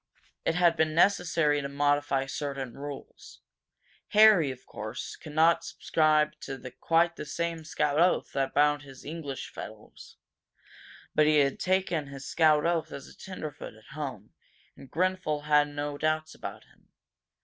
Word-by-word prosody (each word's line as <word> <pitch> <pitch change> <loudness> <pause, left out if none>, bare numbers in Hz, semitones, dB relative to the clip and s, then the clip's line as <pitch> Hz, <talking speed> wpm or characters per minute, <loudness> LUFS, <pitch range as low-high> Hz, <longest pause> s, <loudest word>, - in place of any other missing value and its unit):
It 165 - +1
had 175 -2 +4
been 155 -1 +1
necessary 165 -5 +3
to 140 - -4
modify 145 -1 +1
certain 135 -2 -4
rules. 140 +1 -10 0.7
Harry, 210 -8 +6
of 130 -1 -8
course, 110 +1 -6
could 150 - -11
not 165 +1 +4
subscribe 155 -1 +2
to 135 -2 -7
quite 170 +1 +2
the - - -5
same 165 +1 -3
scout 150 -1 0
oath 180 +2 +2
that 135 -1 -2
bound 145 0 +3
his 135 -2 -13
English 145 -3 -6
fellows. - - -11 1.0
But 150 - +4
he 155 0 +4
had 140 -2 +2
taken 185 -5 0
his 135 -1 -9
scout 155 -2 +3
oath 170 -1 0
as 140 - -8
a - - -16
tenderfoot 155 - -8
at 110 +4 -16
home, 135 -9 -6 0.4
and 135 -1 -14
Grenfel 180 -3 0
had 150 0 +4
no 145 0 -5
doubts 155 0 0
about - - -8
him. - - -27
150 Hz, 150 wpm, -28 LUFS, 140-165 Hz, 1.0 s, Harry